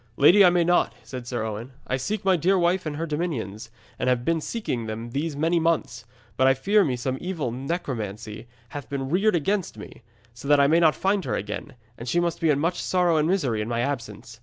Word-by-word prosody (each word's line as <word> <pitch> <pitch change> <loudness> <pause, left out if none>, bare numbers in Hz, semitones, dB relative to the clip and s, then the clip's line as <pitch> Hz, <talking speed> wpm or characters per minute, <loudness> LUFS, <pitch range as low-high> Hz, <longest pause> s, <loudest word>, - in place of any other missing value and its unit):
'Lady, 180 +8 +7
I 180 - +8
may 175 -1 +3
not,' 175 +1 +2
said 125 -2 -8
Sir 120 -2 -2
Owen. 110 +4 -5
'I 130 - -1
seek 200 +10 -3
my 190 -1 +4
dear 185 +4 +2
wife 175 0 +1
and 150 - -3
her 165 +3 -3
dominions, 130 - -4 0.3
and 125 - +1
have 125 -1 +1
been 165 -1 +1
seeking 130 - -3
them 115 +2 -5
these 145 +3 -2
many 165 +4 +1
months. 160 -8 -1 0.3
But 130 - +4
I 135 - +5
fear 200 +10 +3
me 135 -7 0
some 130 +2 -3
evil 170 -9 -3
necromancy 115 - -5 0.2
hath 145 -6 -8
been 135 -1 -3
reared 195 +3 +3
against 190 +4 -1
me, - - -11 0.3
so 120 +4 -10
that 145 0 +5
I 140 - +6
may 160 +4 +4
not 160 -2 +4
find 195 0 0
her - - -1
again, 105 +7 -5 0.2
and 120 +1 -5
she 175 - +2
must 170 -1 -1
be 165 - +2
in 145 - +3
much 170 +5 -1
sorrow 180 -3 +2
and 155 0 +2
misery 140 - 0
in 105 - -3
my 120 0 -1
absence. 115 -4 -5
145 Hz, 230 wpm, -25 LUFS, 120-175 Hz, 0.3 s, I